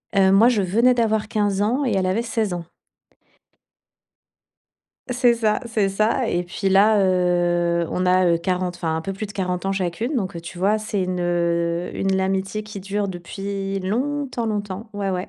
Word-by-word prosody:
heu, 190 Hz, -1 st, +5 dB
moi 220 Hz, +5 st, +6 dB
je 215 Hz, -5 st, +1 dB
venais 230 Hz, +7 st, +3 dB
d'avoir 220 Hz, -2 st, +1 dB
15 205 Hz, -2 st, 0 dB
ans 250 Hz, +7 st, +1 dB
et 235 Hz, -, 0 dB
elle 190 Hz, -1 st, +1 dB
avait 200 Hz, +5 st, +1 dB
16 225 Hz, -4 st, -1 dB
ans. 175 Hz, -1 st, -5 dB, 2.5 s
C'est 245 Hz, -1 st, +3 dB
ça, 215 Hz, -2 st, +1 dB
c'est 215 Hz, -4 st, +1 dB
ça 215 Hz, +5 st, +1 dB
et 175 Hz, -, 0 dB
puis 185 Hz, +3 st, -3 dB
là, 205 Hz, +3 st, +5 dB
heu, 175 Hz, -2 st, +2 dB
on 180 Hz, 0 st, 0 dB
a, 185 Hz, 0 st, +4 dB
heu, 170 Hz, -1 st, +3 dB
40, 180 Hz, +1 st, -1 dB
enfin 160 Hz, -2 st, -2 dB
un -, -, -2 dB
peu 195 Hz, -, -4 dB
plus 205 Hz, +3 st, -5 dB
de 205 Hz, -, -10 dB
40 180 Hz, -2 st, -2 dB
ans 195 Hz, -, 0 dB
chacune. 195 Hz, -, -2 dB
Donc 190 Hz, -6 st, -2 dB
heu, 170 Hz, -, -5 dB
tu 170 Hz, +1 st, -9 dB
vois 205 Hz, +4 st, +2 dB
c'est 215 Hz, -2 st, -3 dB
une, 180 Hz, 0 st, -2 dB
heu, 170 Hz, 0 st, 0 dB
une 195 Hz, 0 st, 0 dB
l'amitié 190 Hz, +2 st, -1 dB
qui 210 Hz, -2 st, -8 dB
dure 200 Hz, +1 st, -2 dB
depuis 195 Hz, +2 st, -4 dB
longtemps, 250 Hz, +5 st, -2 dB
longtemps, 205 Hz, 0 st, -4 dB
ouais 200 Hz, -1 st, -2 dB
ouais. 185 Hz, +1 st, -3 dB
195 Hz, 190 wpm, -22 LUFS, 180-215 Hz, 2.5 s, moi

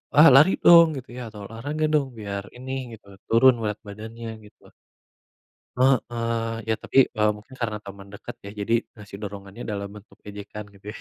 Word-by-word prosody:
"Ah, 150 Hz, +3 st, +9 dB
lari 150 Hz, +8 st, +7 dB
dong!" 170 Hz, -1 st, +9 dB
Gitu 130 Hz, -, -9 dB
ya, -, -, -5 dB
atau, 105 Hz, -, -9 dB
"Olahraga 145 Hz, +8 st, -4 dB
dong, 145 Hz, -3 st, +2 dB
biar 100 Hz, -2 st, -4 dB
ini," 130 Hz, +1 st, -7 dB, 0.2 s
gitu, 110 Hz, -, -14 dB, 0.2 s
"turun 130 Hz, +3 st, +6 dB
berat 105 Hz, -1 st, -2 dB
badannya," 110 Hz, +3 st, -8 dB, 0.2 s
gitu. 105 Hz, -, -20 dB, 1.1 s
Heeh. 115 Hz, -3 st, +1 dB
Ya -, -, +3 dB
tapi, -, -, 0 dB, 0.2 s
eee, 105 Hz, 0 st, +3 dB
mungkin 105 Hz, +5 st, -15 dB
karena 105 Hz, -3 st, -2 dB
teman 100 Hz, 0 st, -10 dB
dekat, -, -, -8 dB
ya. -, -, -6 dB
Jadi, 100 Hz, +3 st, -2 dB, 0.2 s
ngasih 100 Hz, -3 st, -11 dB
dorongannya 100 Hz, +2 st, -8 dB
dalam 100 Hz, -1 st, -4 dB
bentuk 105 Hz, +1 st, -16 dB
ejekan, 105 Hz, +1 st, -8 dB
gitu 100 Hz, 0 st, -19 dB
ya. -, -, -10 dB
110 Hz, 175 wpm, -24 LUFS, 105-125 Hz, 1.1 s, Ah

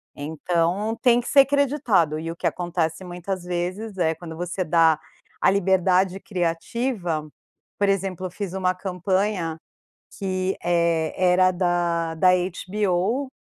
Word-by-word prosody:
Então, 170 Hz, +7 st, -1 dB
tem 240 Hz, -1 st, +5 dB
que 245 Hz, -, -9 dB
ser 275 Hz, -1 st, +6 dB
creditado. 260 Hz, -, +1 dB
E 165 Hz, +1 st, -4 dB
o -, -, -7 dB
que -, -, -7 dB
acontece, 175 Hz, -1 st, -2 dB
muitas 180 Hz, +1 st, -5 dB
vezes, 180 Hz, +4 st, -4 dB
é 165 Hz, -3 st, +2 dB
quando 160 Hz, -1 st, -9 dB
você 180 Hz, +2 st, -2 dB
dá 160 Hz, -1 st, +4 dB, 0.4 s
a -, -, +5 dB
liberdade 190 Hz, -1 st, +2 dB
criativa 175 Hz, -1 st, -2 dB, 0.5 s
Por 200 Hz, -1 st, +3 dB
exemplo, 190 Hz, -2 st, -1 dB
eu 180 Hz, -, -12 dB
fiz 200 Hz, -2 st, -5 dB
uma 185 Hz, -1 st, +1 dB
campanha 185 Hz, -2 st, -1 dB, 0.6 s
que, 185 Hz, -1 st, -1 dB
eh, 170 Hz, -2 st, +1 dB
era 185 Hz, 0 st, +4 dB
da 175 Hz, -2 st, 0 dB
da 185 Hz, +3 st, +4 dB
HBO 190 Hz, +6 st, -1 dB
180 Hz, 135 wpm, -24 LUFS, 170-195 Hz, 0.6 s, ser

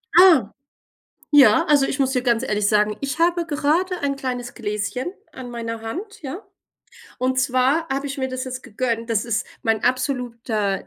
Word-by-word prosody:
Ah, 330 Hz, -, +7 dB, 0.8 s
ja, 285 Hz, -1 st, +6 dB
also 290 Hz, -4 st, +4 dB
ich 270 Hz, -, -3 dB
muss 265 Hz, -1 st, +2 dB
dir 250 Hz, -2 st, 0 dB
ganz 235 Hz, -2 st, +2 dB
ehrlich 210 Hz, -5 st, 0 dB
sagen, 210 Hz, 0 st, +2 dB
ich 275 Hz, +2 st, -3 dB
habe 340 Hz, 0 st, +2 dB
gerade 335 Hz, +5 st, 0 dB
ein 280 Hz, -1 st, -1 dB
kleines 250 Hz, -3 st, -4 dB
Gläschen 220 Hz, -, -3 dB, 0.2 s
an 260 Hz, -4 st, -8 dB
meiner 230 Hz, -1 st, -5 dB
Hand, 380 Hz, -, -6 dB
ja. 310 Hz, +8 st, -6 dB, 0.8 s
Und 260 Hz, +1 st, +1 dB
zwar 260 Hz, +5 st, +1 dB
habe 275 Hz, +1 st, -2 dB
ich 280 Hz, +1 st, -5 dB
mir 260 Hz, -1 st, -1 dB
das 255 Hz, 0 st, -4 dB
jetzt 255 Hz, 0 st, -6 dB
gegönnt, 230 Hz, +1 st, -3 dB
das 220 Hz, -2 st, +1 dB
ist 235 Hz, 0 st, -1 dB, 0.2 s
mein 225 Hz, -2 st, +1 dB
absoluter, 235 Hz, -6 st, -1 dB
255 Hz, 170 wpm, -22 LUFS, 230-285 Hz, 0.8 s, Ah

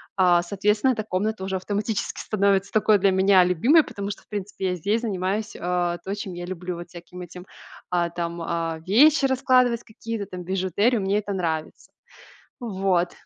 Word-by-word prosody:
а, 180 Hz, -2 st, +4 dB
соответственно 210 Hz, +7 st, +1 dB
эта 220 Hz, -2 st, -3 dB
комната 210 Hz, +1 st, -2 dB
уже 190 Hz, 0 st, -2 dB
автоматически 205 Hz, +3 st, -3 dB
становится 200 Hz, -2 st, +1 dB
такой 215 Hz, -1 st, +3 dB
для 195 Hz, +1 st, +4 dB
меня 190 Hz, 0 st, +5 dB
любимой. 230 Hz, -, +4 dB
Потому 200 Hz, -4 st, -5 dB
что -, -, -8 dB
в -, -, -29 dB
принципе 200 Hz, -2 st, -4 dB
я 180 Hz, -, -1 dB
здесь 205 Hz, +7 st, 0 dB
занимаюсь, 205 Hz, 0 st, -2 dB
а, 175 Hz, -1 st, -1 dB
то 195 Hz, -, -3 dB
чем 200 Hz, -3 st, -6 dB
я 175 Hz, 0 st, -6 dB
люблю. 180 Hz, 0 st, -5 dB
Вот 175 Hz, +1 st, -9 dB
всяким 175 Hz, +1 st, -11 dB
этим, 180 Hz, +1 st, -10 dB, 0.4 s
а, 175 Hz, -1 st, +1 dB
там, 170 Hz, 0 st, -4 dB
а, 165 Hz, -1 st, -2 dB
вещи 280 Hz, -, +5 dB
раскладывать 255 Hz, -3 st, +3 dB
какие-то 220 Hz, -1 st, -6 dB
там, 180 Hz, -1 st, -7 dB
бижутерию- 190 Hz, +5 st, +1 dB
мне 195 Hz, +1 st, +1 dB
это 205 Hz, -1 st, -3 dB
нравится. 160 Hz, -4 st, -4 dB, 0.7 s
Вот. 190 Hz, -6 st, 0 dB
190 Hz, 170 wpm, -24 LUFS, 180-210 Hz, 0.7 s, меня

